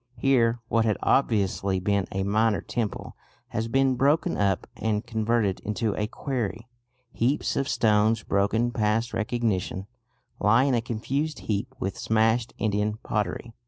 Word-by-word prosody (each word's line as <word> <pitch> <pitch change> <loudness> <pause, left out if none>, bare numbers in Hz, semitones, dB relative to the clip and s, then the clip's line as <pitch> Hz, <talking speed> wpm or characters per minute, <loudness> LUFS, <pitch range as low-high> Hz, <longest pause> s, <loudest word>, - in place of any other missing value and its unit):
Here 120 -2 +3
what 115 -1 +2
had 110 -2 +1
obviously 100 -6 +1
been 100 +1 0
a 95 0 -1
minor 105 +2 +2
temple 115 -4 -4 0.3
has 110 +1 -2
been 135 +2 +2
broken 150 +6 +2
up 100 -2 +1
and 110 0 -1
converted 110 -4 0
into 105 0 -2
a 105 - -1
quarry. 115 -3 -4 0.4
Heaps 130 +6 0
of 135 - -1
stones, 110 0 +2
broken 105 +4 +1
past 115 +1 0
recognition, 105 -4 -1 0.5
lie 115 +5 +4
in 140 -1 +2
a 120 - +2
confused 135 +7 -3
heap 105 -2 -3
with 95 - -3
smashed 110 +1 +2
Indian 105 0 0
pottery. 105 +2 -2
110 Hz, 140 wpm, -26 LUFS, 105-120 Hz, 0.5 s, lie